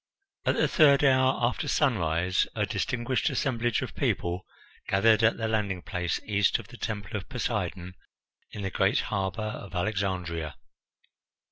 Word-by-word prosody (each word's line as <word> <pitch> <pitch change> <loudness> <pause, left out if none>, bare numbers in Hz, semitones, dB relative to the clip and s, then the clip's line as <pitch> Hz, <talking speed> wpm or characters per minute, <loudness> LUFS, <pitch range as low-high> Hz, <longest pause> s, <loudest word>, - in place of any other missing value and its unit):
At - - +2
the - - +3
third 145 -2 +5
hour 130 -1 +4
after 120 - 0
sunrise 90 - +1
a - - +1
distinguished 125 +1 -1
assemblage 120 -4 0
of - - -6
people 90 +1 -1 0.4
gathered 110 +3 +4
at 115 0 +3
the 115 - -1
landing 100 -5 -1
place 90 +1 -2
east 105 -1 +2
of - - -11
the - - -11
Temple 105 0 -4
of 100 - -5
Poseidon 95 -7 -3 0.6
in 105 - -7
the 95 - -2
great 95 0 +2
harbour 95 +1 -1
of 110 -2 -6
Alexandria. 90 -5 -2
105 Hz, 145 wpm, -28 LUFS, 90-115 Hz, 0.6 s, third